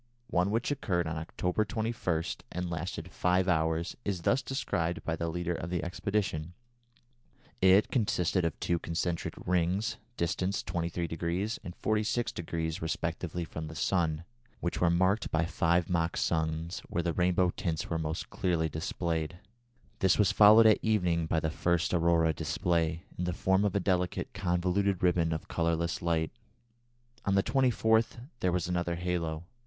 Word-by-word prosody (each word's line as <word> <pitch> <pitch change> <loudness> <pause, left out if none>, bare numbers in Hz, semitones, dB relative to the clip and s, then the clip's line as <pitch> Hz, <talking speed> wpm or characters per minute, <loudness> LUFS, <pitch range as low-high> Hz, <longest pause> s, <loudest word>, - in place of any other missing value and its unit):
One 90 0 +2
which 115 +6 0
occurred 90 -11 0
on 80 +1 -3
October 90 +5 -1
21 110 -7 -1 0.3
and 90 0 -3
lasted 85 +1 -4
five 90 +1 +2
hours 80 0 +1
is 95 -4 -2
thus 135 - +3
described 90 - -2
by 80 - -1
the 85 +1 -3
leader 85 +1 -2
of 85 0 -4
the 90 -2 -1
expedition: 90 -2 -2 1.1
"It 95 +2 +5
consisted 95 -6 +1
of 85 -2 -2
two 85 -1 0
concentric 85 +1 -2
rings, 90 +5 +1 0.2
distant 90 +3 0
23° 85 +3 -2
and 90 - -9
46° 90 -7 -1
respectively 85 +1 -2
from 80 -1 -6
the 80 - -8
sun, 80 -3 0 0.4
which 85 - -2
were 90 - +5
marked 95 +5 +2
by 80 +1 +1
five 85 0 +1
mock 85 -1 0
suns 80 +1 -1
where 85 - -1
the 85 -1 0
rainbow 90 0 +2
tints 85 -5 -3
were 80 - -1
most 80 +1 -4
clearly 85 -3 0
displayed. 80 +1 -2 0.6
This 95 -1 +4
was 105 -1 +4
followed 105 +2 +8
at 110 -1 +6
evening 90 -7 +1
by 80 - +1
the 80 0 -1
first 85 +1 0
aurora 85 -2 +3
display, 85 +2 0 0.2
in 90 - 0
the 90 - -1
form 95 +3 +2
of 105 -2 0
a - - +3
delicate 90 -2 -1
convoluted 95 0 0
ribbon 85 -2 +3
of 80 0 -3
colourless 85 0 0
light. 80 -2 0 0.9
On 100 - +1
the 95 - +4
24th 115 -2 +2
there 90 - +1
was 90 +1 0
another 85 -1 -1
halo. 85 -2 -2
85 Hz, 155 wpm, -30 LUFS, 85-95 Hz, 1.1 s, followed